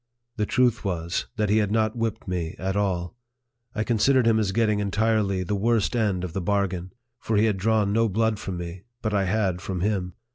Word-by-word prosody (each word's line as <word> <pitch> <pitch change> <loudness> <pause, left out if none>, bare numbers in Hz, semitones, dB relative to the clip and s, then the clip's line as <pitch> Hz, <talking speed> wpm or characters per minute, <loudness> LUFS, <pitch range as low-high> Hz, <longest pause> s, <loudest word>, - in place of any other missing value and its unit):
The 105 -2 0
truth 120 -3 +2
was, 85 -3 -2
that 105 -2 0
he 110 - +4
had 105 -2 0
not 110 0 +1
whipped 115 -2 -3
me 90 -3 -3
at 95 +1 -2
all. 95 -2 -1 0.6
I 105 - 0
considered 120 +3 +3
him 115 -1 +4
as 105 -3 0
getting 105 0 +1
en 100 - -1
tirely 105 -3 +1
the 90 - -3
worst 110 +3 +1
end 100 -6 +1
of 90 -3 -5
the 95 - -2
bargain; 95 -1 -1 0.3
for 110 - -1
he 105 - +4
had 105 -3 +1
drawn 105 0 +1
no 115 0 +3
blood 110 +1 +1
from 95 -2 -4
me, 85 +1 -6 0.2
but 110 -1 -1
I 100 -1 +2
had 95 -3 0
from 90 0 -4
him. 95 -3 -1
105 Hz, 215 wpm, -25 LUFS, 95-110 Hz, 0.6 s, he